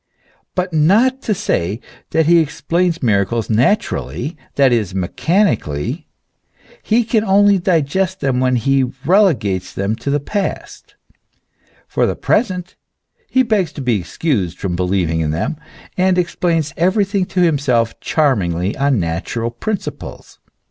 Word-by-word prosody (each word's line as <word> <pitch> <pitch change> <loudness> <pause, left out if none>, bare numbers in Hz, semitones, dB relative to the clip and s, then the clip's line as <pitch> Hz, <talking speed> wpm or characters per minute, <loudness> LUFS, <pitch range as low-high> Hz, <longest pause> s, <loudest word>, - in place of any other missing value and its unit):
But 180 -1 -2
not 215 - +3
to 215 - -1
say 110 - -1 0.3
that 160 -1 +2
he 170 +2 +5
explains 165 +2 -1
miracles 110 0 +1
naturally, 135 - 0 0.2
that 135 -2 +4
is, 105 -6 0
mechanically, 95 - -1 0.7
he 235 +2 +2
can 220 -1 +1
only 200 -1 +4
digest 185 +2 0
them 135 -3 0
when 130 0 +2
he 135 +3 +2 0.2
relegates 135 - +2
them 100 +3 -2
to 140 - -5
the 145 +1 +1
past; 200 +8 -5 0.9
for - - +1
the - - -1
present 185 -5 -1 0.5
he 260 - +3
begs 210 - 0
to 145 - -7
be 120 -5 +1
excused 95 - -2
from 90 -3 -3
believing 90 -3 0
in 75 - -1
them, 85 - -2 0.4
and 185 0 +2
explains 170 -4 0
everything 195 +2 +1
to 185 - -1
himself 135 -9 +1
charmingly 95 - 0
on 140 -4 +2
natural 95 +8 -3
principles. 200 - -6
145 Hz, 130 wpm, -18 LUFS, -, 0.9 s, he